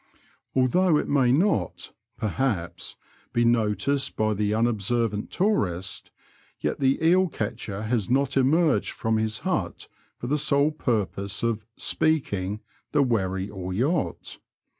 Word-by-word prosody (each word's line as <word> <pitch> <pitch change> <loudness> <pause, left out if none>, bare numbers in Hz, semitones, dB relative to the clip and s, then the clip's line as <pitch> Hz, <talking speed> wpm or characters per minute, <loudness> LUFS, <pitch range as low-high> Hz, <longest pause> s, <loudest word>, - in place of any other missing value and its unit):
Although 150 +6 +3
it - - -1
may 130 -4 +3
not, 135 - +1 0.3
perhaps, 95 -7 -2 0.4
be 120 0 +2
noticed 120 +4 +1
by 110 0 +1
the 105 0 0
unobservant 110 -1 0
tourist, 100 - -1 0.5
yet - - -2
the 135 0 +3
eel 185 +3 +5
catcher 105 - -4
has 110 -2 -1
not 135 +1 +1
emerged 150 +4 +3
from 110 -1 0
his 110 0 -1
hut - - -2 0.3
for - - -7
the 150 +4 0
sole 140 +1 +3
purpose 105 - -2
of 110 -2 -1
" 115 - -55
speaking 105 -10 0
*' - - -38
the 145 -1 +4
wherry 95 -6 0
or 95 -3 -6
yacht. 140 - -1
115 Hz, 135 wpm, -25 LUFS, 105-140 Hz, 0.5 s, eel